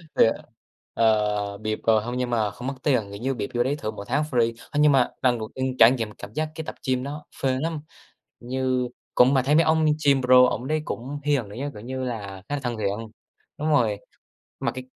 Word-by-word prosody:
Thiệt. 115 - +5 0.6
Ờ, 105 -2 +1
bịp 110 0 -3
rồi, 110 -1 +5
hông 120 +2 -4
nhưng 125 -1 -1
mà 110 -4 +1
không 120 +6 -8
mất 135 - -1
tiền. 135 -6 +3
Kiểu 100 +1 -8
như 135 +2 0
bịp 105 -5 -4
vô 120 0 +2
đấy 135 +3 0
thử 110 -7 -4
mỗi 100 - -8
tháng 145 +5 +1
free. 115 -2 +2 0.2
Ơ, 145 - -1
nhưng 150 -1 +6
mà 130 -3 +4
lần 125 -2 +2
đầu 110 0 -5
tiên 130 -1 -2
trải 115 - +9
nghiệm 115 -5 -2
cảm - - -11
giác 155 0 -1
cái 160 - -5
tập - - -7
gym 130 -1 +1
nó 150 +2 -6 0.2
phê 130 -1 +1
lắm. 160 0 -2 0.6
Như 130 0 -1 0.3
cũng 125 +2 +6
mà 135 - +4
thấy 140 +4 +2
mấy 165 - +6
ông 160 0 +3 0.2
gym 140 -2 +5
pro 125 0 +7
ổng 125 +4 -4
đấy 155 +1 0
cũng 135 +5 -5
hiền 140 -7 0
nữa 100 - -10
chứ, 145 +1 -2
kiểu 105 - -10
như 130 +3 -4
là, 100 -6 -5
khá 145 - -1
là 140 - -4
thân 120 -2 -2
thiện. 110 +2 -3 0.5
Đúng 155 +2 -1
rồi. 115 -9 +3 0.6
Mà - - -1
cái 130 0 -7
125 Hz, 240 wpm, -25 LUFS, 110-140 Hz, 0.6 s, trải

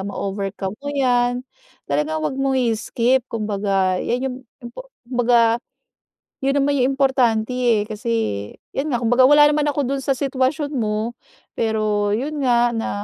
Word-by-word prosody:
ma-overcome 195 0 -4
mo 285 - -6
yan. 250 -3 +1 0.4
Talagang 150 +2 -1
huwag 265 - -2
mong 270 -1 +1
i-skip. 235 +3 +1
Kumbaga, 200 -4 0
yan 250 +2 -1
yung - - -7 0.3
impo 370 - -9 0.2
kumbaga 235 -1 +2 0.8
yun 275 +1 +1
naman 285 +1 +1
yung 255 +2 +2
importante, 255 -5 +2
eh, 240 -4 +2
kasi 220 +2 -4 0.6
'yon 290 +3 -1
nga, 240 - 0
kumbaga 245 +2 +3
wala 295 +1 +7
naman 295 0 +1
ako 290 0 0
do'n 275 0 -2
sa 275 - 0
sitwasyon 275 +3 -1
mo, 220 0 -2 0.4
pero 215 -2 0
yun 285 +5 -3
nga 240 -1 +3
na 225 - -2
240 Hz, 145 wpm, -21 LUFS, 215-270 Hz, 0.8 s, wala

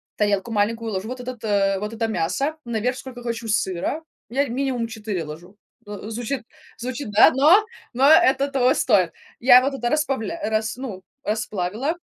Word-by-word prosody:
тарелку 205 +1 0
маленькую 225 +2 0
ложу 190 +2 -3
вот 255 +1 -6
этот, 245 -2 -7
э, 195 -2 +1
вот 210 +1 -4
это 225 0 -1
мясо, 220 - -1
наверх 235 +2 -1
сколько 250 -3 -9
хочу 230 -1 -4
сыра, 210 - -1 0.3
я 275 +4 0
минимум 255 -1 -1
4 210 -6 -4
ложу. 170 +6 -10 0.3
Ну, 205 +1 -7
звучит 240 +2 -3 0.3
звучит, 250 +1 -5
да, 205 - +7
но 330 +11 +5 0.3
но 265 +3 +4
это 285 -4 +5
того 265 0 +2
стоит. 180 - +3 0.3
Я 250 +1 +8
вот 275 +2 -1
это 240 -3 -2
распавля 295 0 -1
э, - - 0
рас 220 0 -1
ну, 220 -8 -6 0.2
расплавила, 215 - -2
230 Hz, 170 wpm, -23 LUFS, 210-265 Hz, 0.3 s, Я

